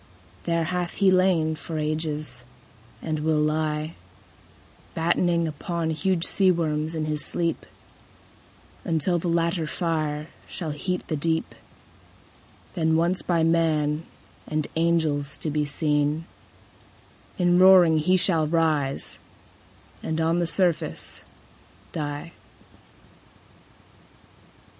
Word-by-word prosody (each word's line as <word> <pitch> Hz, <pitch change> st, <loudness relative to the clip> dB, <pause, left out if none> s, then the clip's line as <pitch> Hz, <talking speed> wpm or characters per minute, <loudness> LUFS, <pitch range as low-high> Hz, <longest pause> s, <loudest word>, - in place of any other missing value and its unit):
There 170 Hz, -1 st, +1 dB
hath 175 Hz, +1 st, -2 dB
he 195 Hz, -2 st, +4 dB
lain 185 Hz, -4 st, +3 dB
for 160 Hz, +1 st, -6 dB
ages, 150 Hz, -4 st, -2 dB, 0.6 s
and 155 Hz, -1 st, -2 dB
will 155 Hz, 0 st, +1 dB
lie 155 Hz, +1 st, 0 dB, 1.0 s
Battening 170 Hz, 0 st, +2 dB
upon 160 Hz, +2 st, -3 dB
huge 175 Hz, +2 st, 0 dB
sea 195 Hz, -2 st, +3 dB
worms 160 Hz, -2 st, 0 dB
in 155 Hz, -1 st, -1 dB
his 150 Hz, -1 st, -1 dB
sleep, 170 Hz, 0 st, -1 dB, 1.2 s
Until 170 Hz, +2 st, +1 dB
the 175 Hz, -, -3 dB
latter 170 Hz, -1 st, 0 dB
fire 155 Hz, -2 st, -2 dB, 0.2 s
shall 165 Hz, -4 st, -4 dB
heat 180 Hz, +5 st, -3 dB
the 155 Hz, -, -1 dB
deep; 160 Hz, +2 st, -1 dB, 1.2 s
Then 160 Hz, -2 st, +1 dB
once 175 Hz, +3 st, +1 dB
by 170 Hz, -2 st, +1 dB
man 160 Hz, -2 st, +1 dB, 0.4 s
and 155 Hz, -1 st, -1 dB
angels 160 Hz, -4 st, +1 dB
to 155 Hz, -, -3 dB
be 150 Hz, 0 st, 0 dB
seen, 150 Hz, +1 st, 0 dB, 1.1 s
In 175 Hz, -1 st, +3 dB
roaring 180 Hz, -4 st, +7 dB
he 185 Hz, +4 st, +3 dB
shall 165 Hz, -4 st, +2 dB
rise 155 Hz, -4 st, 0 dB, 0.8 s
and 160 Hz, 0 st, -2 dB
on 165 Hz, +2 st, +2 dB
the 170 Hz, -, 0 dB
surface 175 Hz, -2 st, -1 dB, 0.7 s
die. 145 Hz, +1 st, -4 dB
160 Hz, 105 wpm, -25 LUFS, 155-170 Hz, 1.2 s, roaring